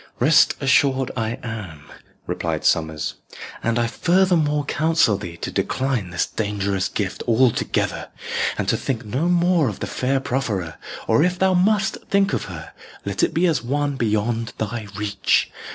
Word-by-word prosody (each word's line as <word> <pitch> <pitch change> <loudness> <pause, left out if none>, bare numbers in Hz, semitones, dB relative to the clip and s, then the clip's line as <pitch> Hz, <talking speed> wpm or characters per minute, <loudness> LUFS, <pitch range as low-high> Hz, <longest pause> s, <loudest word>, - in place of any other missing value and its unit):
"Rest 150 -1 +5
assured 135 -1 +2
I 115 -1 -2
am," 100 -11 -6 0.4
replied - - -3
Sommers; 80 -2 0 0.4
"and 115 0 0
I 120 - +2
further 180 +9 +2
more 150 -2 +1
counsel 160 -8 +2
thee 85 -3 -7
to - - -5
decline 130 -8 -1
this 85 -1 0
dangerous 100 -3 -2
gift 100 -3 -3
altogether, 120 +1 +1 0.5
and - - -2
to - - +2
think 125 -4 -3
no 130 +11 -1
more 175 -5 +3
of 105 - -7
the - - -3
fair 135 +1 0
profferer, 110 - -2 0.3
or - - +4
if 180 +2 +2
thou 190 0 +3
must 195 +2 +2
think 200 0 +2
of - - -1
her, 80 -4 -9 0.3
let 100 -1 -2
it - - +2
be 170 +3 +2
as 160 -6 +2
of 120 - -10
one 145 0 0
beyond 115 -1 -1
thy 110 0 -4
reach. 105 -1 +1
120 Hz, 165 wpm, -22 LUFS, 105-155 Hz, 0.5 s, Rest